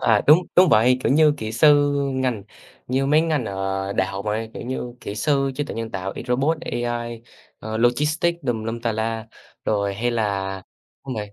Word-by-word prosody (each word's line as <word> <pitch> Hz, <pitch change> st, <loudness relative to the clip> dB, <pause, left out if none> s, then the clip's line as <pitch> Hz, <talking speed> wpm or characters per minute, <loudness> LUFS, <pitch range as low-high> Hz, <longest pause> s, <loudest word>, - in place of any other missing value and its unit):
à, 110 Hz, -3 st, +3 dB
đúng, 150 Hz, +3 st, +8 dB, 0.2 s
đúng 180 Hz, -1 st, +7 dB
vậy, 125 Hz, 0 st, +4 dB
kiểu -, -, +3 dB
như 150 Hz, 0 st, +5 dB
kỹ 110 Hz, -5 st, -5 dB
sư, 145 Hz, +3 st, +5 dB, 0.2 s
ngành 125 Hz, -6 st, -1 dB, 0.4 s
như 135 Hz, +2 st, 0 dB
mấy 150 Hz, +2 st, +4 dB
ngành 155 Hz, -6 st, 0 dB
ở 95 Hz, -1 st, -3 dB
đại 95 Hz, -1 st, +1 dB
học 100 Hz, +1 st, -6 dB
này, 110 Hz, +1 st, -2 dB
kiểu -, -, -6 dB
như, 125 Hz, -1 st, -5 dB
kỹ 100 Hz, -, -6 dB
sư 135 Hz, +3 st, +1 dB
trí 145 Hz, -, -2 dB
tuệ -, -, -7 dB
nhân 115 Hz, 0 st, -4 dB
tạo, 95 Hz, -1 st, -4 dB
y -, -, -6 dB
robot, 140 Hz, +6 st, +1 dB
AI, 120 Hz, -4 st, -4 dB, 0.4 s
ờ, 110 Hz, 0 st, -5 dB
logistics 150 Hz, +8 st, +1 dB
tùm 115 Hz, -3 st, -1 dB
lum 115 Hz, +1 st, -4 dB
tà 115 Hz, -1 st, -1 dB
la, 110 Hz, 0 st, -3 dB, 0.4 s
rồi 100 Hz, -2 st, 0 dB
hay 120 Hz, +4 st, -1 dB
là 100 Hz, -4 st, -1 dB, 0.5 s
đúng 130 Hz, -, -4 dB
vậy. 105 Hz, -2 st, -5 dB
120 Hz, 200 wpm, -22 LUFS, 105-135 Hz, 0.5 s, đúng